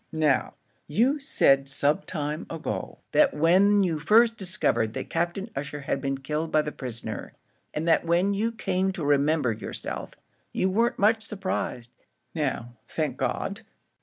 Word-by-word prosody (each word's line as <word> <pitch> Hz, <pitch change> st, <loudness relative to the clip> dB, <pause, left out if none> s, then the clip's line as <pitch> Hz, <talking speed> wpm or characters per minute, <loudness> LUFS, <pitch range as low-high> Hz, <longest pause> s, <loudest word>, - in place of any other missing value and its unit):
"Now, 155 Hz, -4 st, +1 dB, 0.3 s
you 245 Hz, -, +2 dB
said 135 Hz, -, +3 dB
some 145 Hz, +6 st, +1 dB
time 150 Hz, -4 st, -4 dB
ago, 165 Hz, -1 st, -4 dB
that 300 Hz, -2 st, +4 dB
when 195 Hz, +6 st, +5 dB
you 165 Hz, -4 st, 0 dB
first 225 Hz, +8 st, +5 dB
discovered 180 Hz, -, 0 dB
that -, -, -5 dB
Captain 175 Hz, +6 st, -2 dB
Ussher 145 Hz, +1 st, -4 dB
had 140 Hz, -1 st, -2 dB
been 135 Hz, 0 st, -1 dB
killed 150 Hz, +4 st, -3 dB
by 155 Hz, -, +3 dB
the 150 Hz, -, -4 dB
prisoner, 115 Hz, -6 st, -6 dB, 0.4 s
and 155 Hz, +2 st, -3 dB
that 165 Hz, -, +4 dB
when 175 Hz, +4 st, +2 dB
you 220 Hz, +3 st, 0 dB
came 190 Hz, -4 st, 0 dB
to 165 Hz, -5 st, -4 dB
remember 145 Hz, -2 st, +3 dB
yourself, 105 Hz, -3 st, -5 dB, 0.4 s
you 190 Hz, -, +1 dB
weren't 230 Hz, +5 st, +2 dB
much 220 Hz, +2 st, +3 dB
surprised. 190 Hz, -, -4 dB, 0.4 s
Now, 130 Hz, -6 st, -2 dB
thank -, -, -2 dB
God! -, -, -2 dB
160 Hz, 150 wpm, -26 LUFS, 140-200 Hz, 0.4 s, when